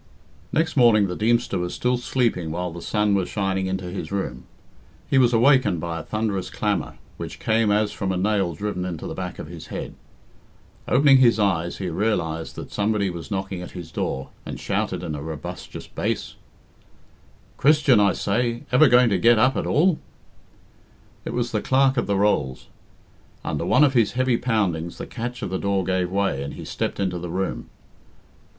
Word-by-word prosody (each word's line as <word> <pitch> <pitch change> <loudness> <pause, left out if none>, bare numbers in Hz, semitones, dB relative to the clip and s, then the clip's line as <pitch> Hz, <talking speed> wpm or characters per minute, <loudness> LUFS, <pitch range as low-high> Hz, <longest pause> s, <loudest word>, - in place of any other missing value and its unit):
Next 160 0 0
morning 115 -6 +5
the 90 -2 -3
Deemster 115 0 +1
was 90 0 -3
still 125 0 +1
sleeping 120 -8 0
while 90 +2 -3
the 85 +1 -8
sun 105 +1 +1
was 95 -2 0
shining 95 -2 -1
into 95 -1 -3
his 95 - -5
room. 95 -10 -3 0.6
He 135 - +3
was 120 -2 +4
awakened 125 - +4
by 85 0 -4
a - - -7
thunderous 105 -3 -2
clamour, - - -2 0.2
which - - -6
came 110 0 +2
as 105 0 +2
from 95 -1 -2
a 95 - -1
nail 95 -3 +1
driven 100 +1 -3
into 90 -3 -5
the - - -4
back - - -5
of - - -6
his - - -10
head. - - -6 0.9
Opening 135 +1 +6
his 120 -3 +5
eyes, 90 -5 0
he 95 - -4
realised 80 -4 -1
that - - -8
somebody 105 -2 0
was 85 -1 -8
knocking 95 -2 -3
at 90 - -9
his 85 -2 -8
door, 65 0 -3
and - - -7
shouting - - -2
in 80 -3 -4
a 75 - -5
robustious 80 -1 -7
bass - - -3 1.2
"Christian, 145 -5 +5
I 100 -2 +4
say! 115 +3 -1
Ever 130 +5 +6
going 125 0 +5
to 95 - +2
get 120 +4 +5
up 130 +4 +3
at - - -2
all?" 170 +2 +3 1.3
It - - -3
was 120 0 -1
the 105 - 0
Clerk 135 0 +3
of 120 - 0
the 100 -1 +1
Rolls. 85 -11 0 0.8
Under 75 +3 -2
one 130 - +5
of 140 -3 +4
his 115 -5 +3
heavy 130 -1 +2
poundings 95 -9 -1
the - - -5
catch 120 0 -5
of - - -3
the 95 - -1
door 100 -1 0
gave 90 0 0
way, 95 -8 0
and 70 +1 -5
he - - -8
stepped - - -3
into 90 -3 -1
the 85 0 -6
room. 95 +3 -3
100 Hz, 185 wpm, -23 LUFS, 90-120 Hz, 1.3 s, Opening